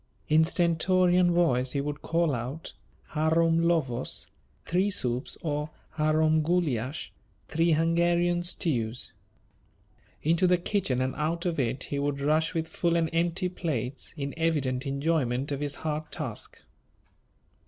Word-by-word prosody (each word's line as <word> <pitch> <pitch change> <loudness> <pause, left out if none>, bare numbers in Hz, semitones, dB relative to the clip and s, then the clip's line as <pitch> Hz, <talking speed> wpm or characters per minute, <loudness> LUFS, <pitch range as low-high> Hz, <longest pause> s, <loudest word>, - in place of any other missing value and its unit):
In 155 +1 +6
stentorian 175 +2 +3
voice 130 -8 +2
he 140 - 0
would 145 +1 -3
call 165 -2 +1
out: 130 +6 -5 0.4
"Harom 165 +1 +3
Lövös" 155 -8 0 0.4
(three 185 +4 +1
soups) 125 -8 -1
or 150 -1 -2 0.3
"Harom 155 0 +3
Gulyas" 150 -5 -1 0.4
(three 165 +1 +2
Hungarian 170 +2 +2
stews). 125 - -1 1.1
Into 170 +4 +3
the 180 0 +4
kitchen 170 -8 0
and 130 0 0
out 165 +3 -1
of 170 -4 -1
it 130 +1 0
he 140 - -3
would 140 0 -1
rush 155 +4 +1
with 165 0 -1
full 170 0 0
and 165 -1 +1
empty 170 +2 +1
plates, 140 -8 -4
in 140 -1 -3
evident 140 -5 0
enjoyment 140 -2 0
of 140 - -2
his 145 -1 -3
hard 155 0 -4
task. 135 -10 -5
155 Hz, 130 wpm, -28 LUFS, 140-170 Hz, 1.1 s, In